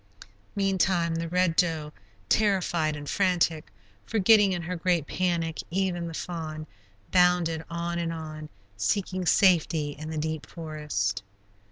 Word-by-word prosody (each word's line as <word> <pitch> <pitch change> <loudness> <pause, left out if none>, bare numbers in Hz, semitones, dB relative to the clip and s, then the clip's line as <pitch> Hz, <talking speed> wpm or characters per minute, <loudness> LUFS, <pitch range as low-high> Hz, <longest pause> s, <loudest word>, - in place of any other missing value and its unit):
Meantime, 190 -3 +1
the 165 0 -2
Red 180 -1 +2
Doe, 160 -4 0 0.3
terrified 175 - +2
and 145 0 -8
frantic, 175 -4 +1 0.4
forgetting 210 -2 +5
in 175 -2 -2
her 180 +2 -3
great 175 -2 +1
panic 170 -2 -1
even 175 -1 -1
the 165 - -6
fawn, 155 -3 -5 0.5
bounded 180 -3 +3
on 170 0 -3
and 165 -1 -1
on, 155 -2 -7 0.3
seeking 185 - -1
safety 165 -6 +3
in 155 +2 -8
the 160 - -4
deep 155 0 -3
forest. 150 - -3
170 Hz, 130 wpm, -27 LUFS, 155-180 Hz, 0.5 s, forgetting